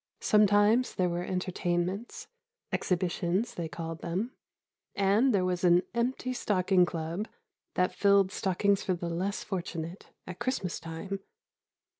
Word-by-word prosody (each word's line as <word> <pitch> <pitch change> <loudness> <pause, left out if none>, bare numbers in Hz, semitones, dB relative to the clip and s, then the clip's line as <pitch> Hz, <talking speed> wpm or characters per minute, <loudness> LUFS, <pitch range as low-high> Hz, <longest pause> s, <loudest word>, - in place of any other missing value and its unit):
Sometimes 210 +3 +4
there 180 -1 +1
were 175 0 -2
entertainments, 180 +3 -2 0.4
"exhibitions" 185 +4 0
they 170 -2 -4
called 165 +1 -6
them, 190 +9 -2 0.6
and 205 +7 +3
there 195 -4 +2
was 180 -1 -1
an 175 0 +5
Empty 255 +2 -1
Stocking 185 -5 +2
Club 170 +5 -3 0.5
that 180 0 +2
filled 200 -1 +4
stockings 195 +2 +1
for 185 - 0
the 170 0 -4
less 185 +4 -2
fortunate, 170 -2 -5 0.2
at 180 - -8
Christmas 195 -9 -2
time. 165 +5 -5
185 Hz, 125 wpm, -30 LUFS, 175-205 Hz, 0.6 s, an